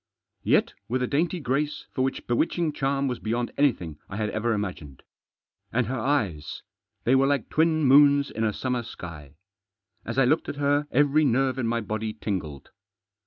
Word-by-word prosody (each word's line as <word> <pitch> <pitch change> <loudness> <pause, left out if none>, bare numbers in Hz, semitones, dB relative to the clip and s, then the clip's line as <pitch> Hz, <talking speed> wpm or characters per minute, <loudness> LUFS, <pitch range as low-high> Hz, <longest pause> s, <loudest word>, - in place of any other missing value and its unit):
Yet - - +2 0.2
with 125 +2 0
a - - 0
dainty 165 +6 0
grace 145 +2 -2
which 130 0 -1
for - - -36
bewitching 155 +5 +1
charm 140 0 0
was 125 -2 -3
beyond 120 +2 -2
anything 90 - 0
I 95 - -6
had 105 -1 -1
ever 115 +2 -1
imagined. 90 - -4 0.7
And 120 +1 +1
her 130 0 -3
eyes! 110 - -1 0.4
They 125 - +3
were 135 +1 +4
like 140 -5 0
twin 160 0 +2
moons 140 +1 +5
in 110 - -3
a 110 - +2
summer 125 +3 -2
sky. 80 - -10 0.7
As 115 - -5
I 135 - +5
looked 155 +6 +1
at - - -4
her 145 +1 +1
every 145 +3 +3
nerve 130 -1 +1
in 120 - 0
my 115 0 0
body 110 +1 -3
tingled. 90 -10 -5
125 Hz, 175 wpm, -26 LUFS, 110-145 Hz, 0.7 s, moons